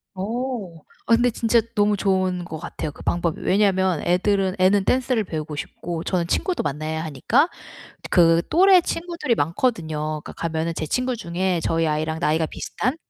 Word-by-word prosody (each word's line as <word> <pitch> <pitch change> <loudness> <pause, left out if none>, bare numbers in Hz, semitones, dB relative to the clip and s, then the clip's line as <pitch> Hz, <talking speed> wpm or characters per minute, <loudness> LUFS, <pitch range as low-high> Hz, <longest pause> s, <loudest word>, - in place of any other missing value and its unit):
어. 220 -1 -4 0.3
아 230 - +7
근데 245 +1 +3
진짜 230 0 +2
너무 205 0 +3
좋은 185 -2 0
거 165 -2 -7
같아요 155 - -5
그 - - -15
방법이. 170 -2 -1
왜냐면 190 -4 +2
애들은 190 +1 +1
애는 190 +2 +4
댄스를 255 -3 +1
배우고 155 -4 -5
싶고 165 +3 -5
저는 175 -2 -1
친구도 365 - 0
만나야 155 +2 -3
하니까 220 - +2 0.6
그 165 -2 +5
또래 370 +2 +6
친구들이 335 -6 -2
많거든요. 155 - -1
그니까 - - -8
가면은 165 0 -2
제 155 - -3
친구 255 - -1
중에 180 -3 -1
저희 165 0 +1
아이랑 155 +1 -1
나이가 160 -1 +1
비슷한 255 - -3
185 Hz, 355 characters per minute, -23 LUFS, 160-230 Hz, 0.6 s, 아